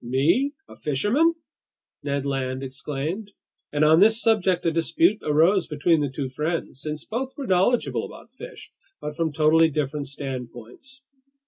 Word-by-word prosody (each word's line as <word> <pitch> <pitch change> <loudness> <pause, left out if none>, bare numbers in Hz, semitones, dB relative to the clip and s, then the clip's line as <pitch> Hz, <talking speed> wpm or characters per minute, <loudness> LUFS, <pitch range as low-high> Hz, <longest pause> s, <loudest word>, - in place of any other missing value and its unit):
"Me? 145 - +2 0.2
A - - -13
fisherman!" 210 - +1 0.7
Ned 140 -1 -2
Land 135 -1 -2
exclaimed. 150 +9 -5 0.4
And 150 +1 +2
on 160 +2 +6
this 220 +3 +5
subject 205 -7 +2
a 165 - +3
dispute 165 +5 +2
arose 165 +6 +3
between 155 +1 +1
the 145 - -1
two 135 +1 -4
friends, 150 0 -3
since 150 -1 -5
both 260 +4 -4
were 280 - -5
knowledgeable 195 +5 +1
about - - -13
fish, - - -11 0.3
but 150 0 -6
from 165 -1 -1
totally 160 +2 +4
different 145 -1 -3
standpoints. 135 - -8
155 Hz, 145 wpm, -24 LUFS, 140-195 Hz, 0.7 s, on